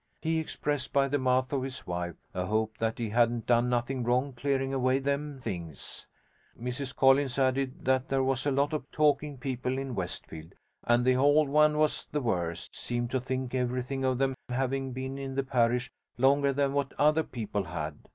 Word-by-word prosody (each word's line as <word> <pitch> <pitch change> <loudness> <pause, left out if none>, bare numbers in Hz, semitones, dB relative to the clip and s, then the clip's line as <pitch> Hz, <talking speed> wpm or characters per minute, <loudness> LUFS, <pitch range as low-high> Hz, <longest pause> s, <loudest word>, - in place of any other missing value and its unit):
He 160 0 0
expressed, 145 -3 -3
by 140 -1 +3
the 145 +1 0
mouth 130 +1 +1
of 135 - +1
his 130 0 -6
wife, 85 -1 -3 0.2
a 90 0 -2
hope 110 +1 -1
that 115 0 0
he 115 -2 -2
hadn't 115 0 +2
done 120 0 +3
nothing 125 +1 0
wrong 125 +3 +1
clearing 135 +1 -1
away 130 0 +2
them 140 +1 -2
things. 85 - -6 0.5
Mrs 125 +3 -4
Collins 135 -1 +4
added 135 +4 0
that 130 0 +2
there 135 -1 +2
was 135 +1 0
a - - +3
lot 140 +3 +1
of 145 -3 -3
talking 150 -1 +2
people 130 -1 -2
in 135 -1 -3
Westfield, 85 -4 -6 0.3
and 120 +1 +3
the 130 - +5
hold 145 +3 +4
ones 150 +1 +4
was 155 0 +1
the 150 - 0
worst: 85 -8 -2
seemed 120 0 -3
to 130 - +1
think 130 0 -3
everything 125 +1 -1
of 130 -1 +1
them 135 0 +1 0.2
having 135 +1 -1
been 130 +2 -5
in 135 -1 -5
the 135 - +1
parish 125 -1 +1 0.3
longer 140 +2 +4
than 140 0 +1
what 140 -1 -1
other 150 +2 +4
people 105 - -3
had. 80 -3 -5
130 Hz, 190 wpm, -29 LUFS, 120-140 Hz, 0.5 s, the